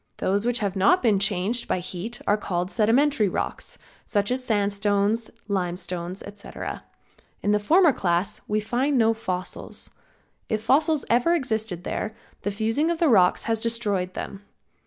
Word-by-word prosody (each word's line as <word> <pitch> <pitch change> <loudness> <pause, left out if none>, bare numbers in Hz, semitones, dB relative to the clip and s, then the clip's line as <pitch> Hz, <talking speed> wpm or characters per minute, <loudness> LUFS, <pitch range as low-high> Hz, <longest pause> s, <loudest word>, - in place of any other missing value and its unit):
Those 200 +4 0
which 245 0 +1
have 200 -2 -1
not 195 - +4
been 215 -5 +3
changed 205 +4 +1
by - - +1
heat 185 +6 -6
are 205 - +3
called 180 -3 -3
sedimentary 230 0 +3
rocks, - - -4 0.3
such 205 0 0
as 255 0 0
sandstones, 205 0 +1 0.2
limestones, 180 -1 -3
etc. 205 0 -7 0.6
In 205 - +2
the 210 - +3
former 320 - +5
class 180 +1 -1
we 210 +1 +1
find 255 +6 0
no 225 -1 +4
fossils. 185 -5 -5 0.6
If 215 0 -1
fossils 300 +4 +3
ever 250 +9 +3
existed 220 - -2
there, 215 +2 -3 0.3
the - - -1
fusing 225 +10 0
of 340 - 0
the 325 -2 +3
rocks 185 -6 +4
has 225 -1 0
destroyed 205 -6 -1
them. 195 - -6
215 Hz, 155 wpm, -25 LUFS, 195-240 Hz, 0.6 s, former